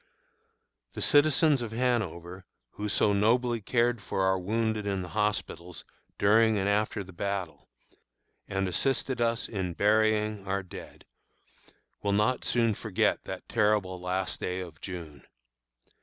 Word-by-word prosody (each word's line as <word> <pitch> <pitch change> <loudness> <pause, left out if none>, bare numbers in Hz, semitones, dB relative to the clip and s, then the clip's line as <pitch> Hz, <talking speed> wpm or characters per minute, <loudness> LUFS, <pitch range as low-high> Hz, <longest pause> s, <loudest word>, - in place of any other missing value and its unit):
The - - -5
citizens 145 -1 +4
of 115 -2 -5
Hanover, 95 -7 -2 0.3
who 105 0 -4
so 100 +1 +3
nobly 115 +3 +2
cared 120 +1 +1
for 95 - -2
our 95 0 +2
wounded 110 +2 -1
in 95 -2 -1
the 90 - -8
hospitals 95 -3 -2 0.3
during 110 +2 +4
and 95 0 0
after 105 0 0
the 95 0 -13
battle, 100 -2 -4 0.8
and 95 0 -1
assisted 130 +5 -1
us 115 -1 0
in 95 -5 -3
burying 105 -1 +2
our 95 0 -1
dead, 90 - -11 1.0
will 100 -1 0
not 105 +5 +1
soon 115 -2 +2
forget 105 -1 0
that - - -7
terrible 105 -5 +1
last 95 +1 -2
day 90 +1 -3
of 85 -4 -9
June. 85 -7 -8
105 Hz, 135 wpm, -28 LUFS, 95-115 Hz, 1.0 s, citizens